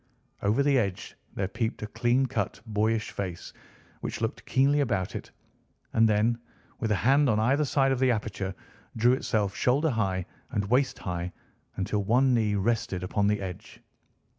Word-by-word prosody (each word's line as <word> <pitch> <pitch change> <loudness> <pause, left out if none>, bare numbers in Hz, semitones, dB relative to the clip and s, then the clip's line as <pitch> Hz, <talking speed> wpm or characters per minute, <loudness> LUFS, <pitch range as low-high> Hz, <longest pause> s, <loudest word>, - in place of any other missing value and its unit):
Over 105 +7 +2
the 140 -2 +4
edge 100 -5 -3 0.2
there 95 - -1
peeped 110 +3 -3
a - - -1
clean 120 +5 +1
cut, 110 -5 -2
boyish 110 +1 0
face, 90 -4 -5 0.5
which - - -4
looked - - -3
keenly 140 +3 +3
about 100 -10 0
it, - - -6 0.6
and 110 0 +5
then, 110 +3 +2 0.4
with 110 - -1
a 105 - +3
hand 135 +6 +3
on 110 -2 +2
either 135 +7 +2
side 135 -1 +2
of 130 - 0
the 130 0 +3
aperture, 100 -4 -2 0.4
drew 120 +3 +5
itself 105 -6 0
shoulder 140 +5 +2
high 95 -6 -1 0.2
and 100 - -1
waist 130 +2 +2
high, 90 -1 -4 0.4
until 100 +2 -1
one 125 +5 +3
knee 110 -3 +2
rested 110 -2 0
upon 100 +2 +1
the 105 0 +1
edge. 90 -2 -8
110 Hz, 165 wpm, -28 LUFS, 100-125 Hz, 0.6 s, and